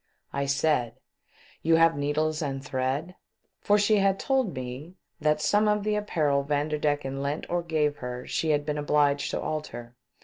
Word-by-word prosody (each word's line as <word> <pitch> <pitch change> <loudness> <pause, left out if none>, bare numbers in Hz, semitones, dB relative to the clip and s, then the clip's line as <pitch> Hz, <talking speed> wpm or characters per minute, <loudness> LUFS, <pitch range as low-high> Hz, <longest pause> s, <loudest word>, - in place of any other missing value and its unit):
I 140 0 -1
said: 140 -4 +1 0.3
" - - -28
You 165 +1 +4
have 165 0 +5
needles 150 +2 0
and 135 -2 -3
thread 135 +6 -2 0.3
?" - - -50
for 205 - +4
she 210 +1 +3
had 195 -1 +2
told 265 -8 0
me 130 +7 -7 0.2
that 150 0 +1
some 210 +7 +3
of 210 -1 +2
the 215 0 0
apparel 155 -9 +1
Vanderdecken 145 -1 -1
lent 140 +2 -3
or 175 0 +1
gave 155 -3 0
her 125 -1 -6
she 160 - -1
had 145 -1 +1
been 150 0 -2
obliged 145 -1 +2
to - - -2
alter. 120 -6 -5
150 Hz, 175 wpm, -27 LUFS, 140-165 Hz, 0.3 s, have